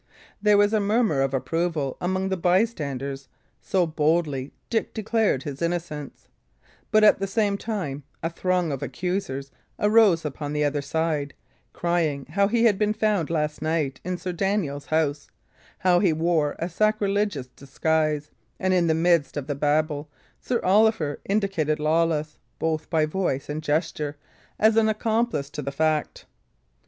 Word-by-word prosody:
There 210 0 +5
was 205 +1 +4
a 215 - +3
murmur 205 - +2
of 135 -1 +1
approval 155 0 -1
among 185 +2 -1
the 190 - 0
bystanders, 150 - 0 0.3
so 185 -2 +1
boldly 155 -3 0 0.2
Dick 225 -2 -1
declared 220 - +1
his 140 0 -6
innocence; 170 -4 -4 0.6
but 215 -1 +4
at 210 - +6
the 195 - -1
same 205 0 +1
time 190 -10 -4 0.2
a 165 - 0
throng 180 -1 0
of 135 - -4
accusers 140 -1 -3 0.3
arose 210 -6 +4
upon 145 0 -4
the 150 0 +1
other 145 0 0
side, 155 -1 -2 0.4
crying 165 -5 -1
how 200 +3 +3
he 230 +2 +1
had 210 -5 +4
been 210 0 +2
found 210 -7 +1
last 150 -2 -1
night 155 -4 -1
in 180 +1 -3
Sir 180 - -4
Daniel's 175 -7 -1
house, 150 -2 0 0.5
how 180 -1 +3
he 180 -5 +3
wore 160 -2 +1
a 170 - -2
sacrilegious 205 -4 0
disguise; 150 +2 -1 0.3
and 185 0 +1
in 175 -2 +3
the 160 - +3
midst 165 -3 +2
of 145 - -3
the 145 - -2
babel, 150 +1 0 0.3
Sir 245 -2 -1
Oliver 195 -6 +3
indicated 195 -7 0
Lawless, 155 -1 0 0.2
both 160 -1 -2
by 160 -2 +2
voice 155 -5 -2
and 150 +1 -3
gesture, 150 -1 -1 0.4
as 220 +1 +4
accomplice 220 -7 +1
to 150 - -5
the 140 0 -4
fact. 155 +1 -1
165 Hz, 150 wpm, -25 LUFS, 150-195 Hz, 0.6 s, at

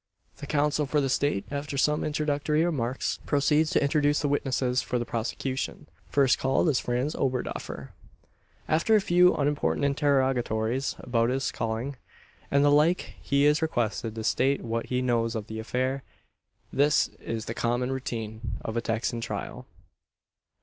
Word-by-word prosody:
The 145 - -8
counsel 150 0 +1
for 150 +2 +1
the 135 -2 0
State, 130 -6 0
after 140 0 -4
some 150 +2 +2
introductory 150 +1 0
remarks, 130 -6 -1
proceeds 150 +2 +3
to - - +2
introduce 145 0 +2
the 145 - 0
witnesses 130 -3 0
for 125 - -2
the 120 - -2
prosecution. 130 +5 -3 0.2
First 135 -3 +3
called 135 +5 +2
is 135 - +2
Franz 125 +5 -1
Oberdoffer. 125 - -3 0.8
After 165 +8 +3
a - - +6
few 180 -1 +4
unimportant 145 0 0
interrogatories 135 -4 +1
about 115 -1 0
his 135 +2 -1
calling, 115 +4 -3 0.5
and 140 +1 +3
the 145 - +5
like, 155 +5 +3
he 140 +1 +2
is 150 +1 +4
requested 115 -7 -1
to 110 - -4
state 135 +5 +1
what 115 0 -2
he 125 0 0
knows 115 -2 +1
of 110 -2 -3
the 110 0 -6
affair. 130 +4 -1 0.7
This 145 +2 +3
is 115 -1 -4
the 115 - -4
common 120 +2 0
routine 115 -4 -4
of 110 - -3
a 115 - +1
Texan 115 +1 -2
trial. - - -5
135 Hz, 155 wpm, -27 LUFS, 120-145 Hz, 0.8 s, a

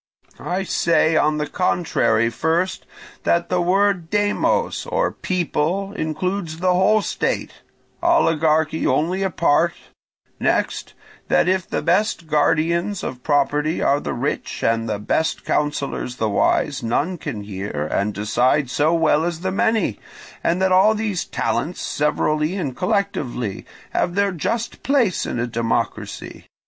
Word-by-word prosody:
I 185 +2 -2
say, 165 -3 +2
on 155 0 +2
the 150 - -1
contrary, 130 -9 +1
first, 165 +7 -1 0.3
that 170 0 +1
the 180 -1 +1
word 185 -1 +2
demos, 205 +1 0
or - - 0
people, 185 +2 -1
includes 170 0 -3
the 180 +1 +2
whole 200 +4 +3
state, - - -2 0.4
oligarchy 160 - +2
only 165 +8 +1
a 195 - +1
part; 170 0 +2 0.7
next, - - -1 0.3
that - - +3
if 185 -1 0
the - - -2
best 175 +1 +1
guardians 165 +5 +1
of 125 -1 -5
property 145 +2 +1
are 140 - +2
the - - -4
rich, 130 +4 -3
and 115 0 +1
the 105 - -1
best 155 +10 -1
counsellors 145 -4 -1
the 110 - -1
wise, 140 +6 +1
none 150 +10 -1
can 115 -9 -5
hear 95 -7 -4
and 100 +2 0
decide 125 +6 +1
so 155 +5 +2
well 160 -2 +3
as 170 -1 -3
the 190 +1 -1
many; 205 - +1 0.4
and 170 +2 +1
that 190 - +2
all 190 +4 +5
these 210 -4 -2
talents, 175 - -2
severally 150 +2 0
and 140 -10 -3
collectively, 180 - -2 0.2
have 175 - 0
their 200 0 +2
just 225 +7 -3
place 255 -9 +1
in - - -3
a 120 - 0
democracy. 115 -3 -3
160 Hz, 140 wpm, -21 LUFS, 145-185 Hz, 0.7 s, all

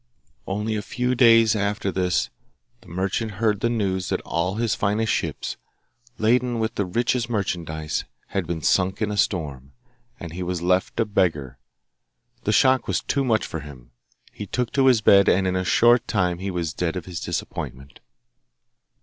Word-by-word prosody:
Only 105 +3 -2
a 105 - -2
few 125 +3 -1
days 115 -3 +5
after 100 -1 -1
this 90 -2 0 0.5
the - - -19
merchant 95 +5 -2
heard 105 0 0
the 120 - +1
news 95 -5 -1
that - - 0
all 90 +3 -2
his 115 -1 0
finest 105 +2 0
ships, - - -3 0.6
laden 120 +2 +2
with 110 +1 -1
the 100 -4 -2
richest 120 +4 0
merchandise, 85 -8 -2 0.3
had 95 -4 -2
been 80 -2 -4
sunk 95 +1 +2
in 105 -1 -1
a - - -2
storm, 70 -9 -2 0.5
and 85 -2 -8
he 90 - -5
was 90 -1 -2
left 90 +2 0
a 115 - +3
beggar. 75 - -1 0.9
The 105 - +2
shock 130 +4 +3
was - - 0
too 140 - -1
much 110 -5 +1
for 80 - -5
him. 65 -5 -12 0.4
He 105 - -8
took 125 +4 -2
to 135 -1 +3
his 125 -4 +5
bed, 100 -1 +6
and 95 +1 +3
in 95 0 0
a 95 - 0
short 120 +6 +4
time 90 -5 0
he 95 +1 -3
was 85 -4 -3
dead 85 0 -2
of 90 -3 -5
his 90 -2 -6
disappointment. 70 -5 -5
100 Hz, 175 wpm, -23 LUFS, 85-110 Hz, 0.9 s, bed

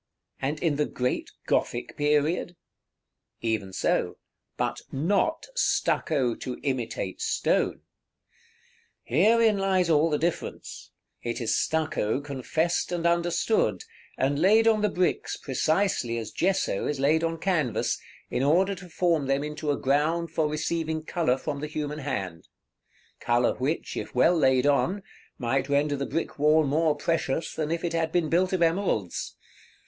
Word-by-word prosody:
and 145 +3 -1
in 155 -4 +1
the 150 - +1
great 125 0 -2 0.2
Gothic 120 - -1
period? 150 +4 +1 0.9
Even 110 -4 -1
so, - - 0 0.4
but - - -2
not 195 - 0
stucco 140 - +1
to 125 +2 -6
imitate 125 -8 -3
stone. - - 0 1.2
Herein 215 - +3
lies 190 -3 +2
all 155 +1 +4
the 150 - +1
difference; 170 +2 -4 0.3
it 120 -1 -3
is 115 -3 0
stucco 155 -8 0
confessed 145 +6 -1
and 175 -1 -2
understood, 170 - +1 0.3
and 140 +2 +1
laid 215 +6 +5
on 220 -2 +4
the 210 - +2
bricks 180 -1 -1
precisely 150 -3 0
as 110 -2 -5
gesso 185 - 0
is 145 -2 -2
laid 155 +4 +3
on 165 0 -1
canvas, 155 - 0 0.3
in - - 0
order 180 +8 +3
to 185 -2 -10
form 165 -4 +1
them 135 +1 +1
into 150 0 -4
a 145 - +1
ground 155 +5 +1
for 160 -2 +1
receiving 160 +1 -2
color 160 -6 0
from 145 +1 -4
the 150 - -4
human 150 0 -4
hand, 95 - -4 0.7
color 120 0 +2
which, 140 +6 -2
if - - -6
well 175 - +5
laid 130 -4 +3
on, 180 +7 +2 0.3
might 135 +2 -1
render 145 +1 +2
the 140 0 -3
brick 165 - -3
wall 155 +2 +5
more 155 +2 +2
precious 160 0 -1
than 155 -1 -2
if 165 0 -2
it 170 - -1
had 165 -1 0
been 170 -2 +1
built 180 +3 +2
of 185 -2 +2
emeralds. 165 - -1
155 Hz, 145 wpm, -27 LUFS, 135-170 Hz, 1.2 s, laid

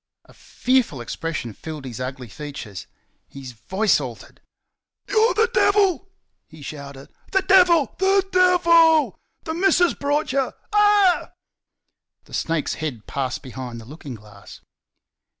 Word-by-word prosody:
A - - -19
fearful 250 - -1
expression 120 -1 -5
filled 155 +3 -8
his 125 -3 -7
ugly 130 0 -6
features. 120 - -8 0.4
His 135 -2 -10
voice 190 - 0
altered. - - -9 0.7
"You're 440 -4 +2
the 445 +2 +3
Devil!" 390 -2 +2 0.4
he 155 -3 -14
said; 140 -2 -9 0.2
"THE 390 -1 +2
DEVIL! 350 -6 +4
THE 390 0 +2
DEVIL! 335 -4 +4 0.2
The 320 - -4
missus 355 0 +3
brought 290 +1 -1
you 270 0 -1 0.2
ah 415 -3 +5
h - - -10
h!" - - -30 0.9
The - - -19
snake's 165 -2 -1
head 130 -9 -5
passed 130 -1 -4
behind 125 -3 -7
the 115 - -12
looking 140 -1 -9
glass. 105 -2 -15
180 Hz, 130 wpm, -22 LUFS, -, 0.9 s, ah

